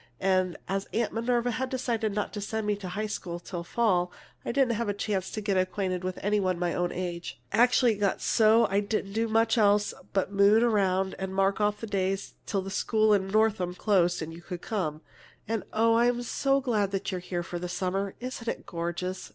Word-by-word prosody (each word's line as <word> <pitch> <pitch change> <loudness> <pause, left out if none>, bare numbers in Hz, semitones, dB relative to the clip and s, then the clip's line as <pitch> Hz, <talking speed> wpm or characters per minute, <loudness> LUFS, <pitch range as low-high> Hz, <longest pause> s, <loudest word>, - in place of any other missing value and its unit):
And 185 -2 +1
as 195 0 -2
Aunt 230 -1 0
Minerva 240 +1 +1
had 255 +3 -2
decided 235 -4 -1
not 210 - -2
to 205 - -4
send 220 +1 -3
me 210 0 +1
to 195 -2 -7
high 210 +4 -2
school 175 -5 -5
till 175 0 -6
fall, 180 -3 +1 0.3
I - - -2
didn't 255 -1 +2
have 230 -1 -2
a 205 - -1
chance 200 -3 -2
to 215 - -4
get 200 -2 0
acquainted 185 -1 -1
with 185 0 -3
any 205 +1 +2
one 185 -2 +1
of - - -9
my 175 -1 0
own 175 0 0
age. 175 -6 -5
Actually, 245 0 +4
it - - -7
got 200 -2 +1
so 225 +1 +4
I 200 - +3
didn't 200 -1 -2
do 225 +1 +1
much 225 +1 +2
else 205 0 +3 0.2
but 195 0 0
moon 200 +3 +5
around 195 -4 +2
and 190 0 -4
mark 195 +1 +2
off 210 0 +1
the - - -3
days 195 -2 -2
till 195 -2 -1
school 215 +2 +2
in 195 -2 +2
Northam 200 -3 +1
closed 180 -4 +2
and 160 +1 -7
you 170 - -10
could 180 0 -7
come. 155 -8 -2 0.5
And, 225 0 -2
oh, 225 +1 +3
I'm 240 +1 +2
so 275 +3 +1
glad 205 -6 0
you're 185 - -2
here 175 -1 -3
for 175 0 -5
the 180 0 -4
summer! 185 +2 -2
Isn't 250 -2 -6
it - - -3
gorgeous!" 175 +2 -4
200 Hz, 215 wpm, -28 LUFS, 185-225 Hz, 0.5 s, moon